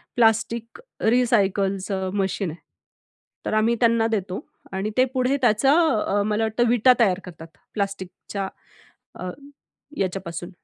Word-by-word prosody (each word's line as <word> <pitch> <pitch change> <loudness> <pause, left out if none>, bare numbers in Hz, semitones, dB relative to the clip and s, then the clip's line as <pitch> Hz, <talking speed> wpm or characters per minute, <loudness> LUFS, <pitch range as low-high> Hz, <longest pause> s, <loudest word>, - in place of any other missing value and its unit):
Plastic 230 0 +1 0.2
रिसायकलचं 195 -5 +1
machine 195 -1 -1
आहे. 165 - -11 0.9
तर - - -1
आम्ही 220 +2 +3
त्यांना 230 -1 +4
देतो 195 -3 -2 0.3
आणि 195 +3 -2
ते 255 - +6
पुढे 260 +1 +1
त्याचं 245 +2 +4 0.3
अ, 205 +1 +1
मला 215 +1 0
वाटतं 225 +2 +1
विटा 245 +2 +5
तयार 195 -5 +3
करतात. 165 -2 -10 0.3
प्लास्टिकच्या 195 -1 -4 0.7
अ, 185 - -5 0.7
ह्याच्यापासून 180 -3 -3
210 Hz, 120 wpm, -23 LUFS, 190-230 Hz, 0.9 s, ते